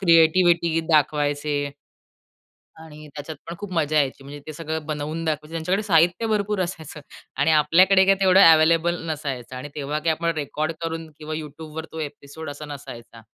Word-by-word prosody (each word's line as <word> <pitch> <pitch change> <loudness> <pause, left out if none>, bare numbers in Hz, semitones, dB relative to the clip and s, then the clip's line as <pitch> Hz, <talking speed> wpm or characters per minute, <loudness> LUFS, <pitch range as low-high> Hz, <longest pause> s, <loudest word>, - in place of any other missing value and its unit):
Creativity 170 -1 +4
दाखवायचे. 145 -1 +1 1.1
आणि 155 -1 -12
त्याच्यात 150 +1 -7
पण 170 - -6
खूप 205 -2 -7
मजा 155 -2 0
यायची. 135 -1 -2
म्हणजे 145 +1 -9
ते 155 - -6
सगळं 160 0 -5
बनवून 155 +2 -4
दाखवायचे. 155 0 -3
त्यांच्याकडे 180 +6 -1
साहित्य 175 +2 +3
भरपूर 210 -2 0
असायचं. 165 -4 -6 0.4
आणि 145 +3 +3
आपल्याकडे 185 +6 +5
काय 195 0 +5
तेवढं 190 0 +6
अवेलेबल 165 +2 +3
नसायचं. 135 -5 -5
आणि 130 +3 -7
तेव्हा 145 +1 -3
काय 165 +1 +1
आपण 165 +1 -1
रेकॉर्ड 155 +1 -2
करून 165 -1 -4
किंवा 155 0 -6
YouTubeवर 155 +1 -7
तो 160 - -7
एपिसोड 145 +1 -7
असा 145 +1 -8
नसायचा. 120 -5 -10
155 Hz, 155 wpm, -23 LUFS, 145-165 Hz, 1.1 s, तेवढं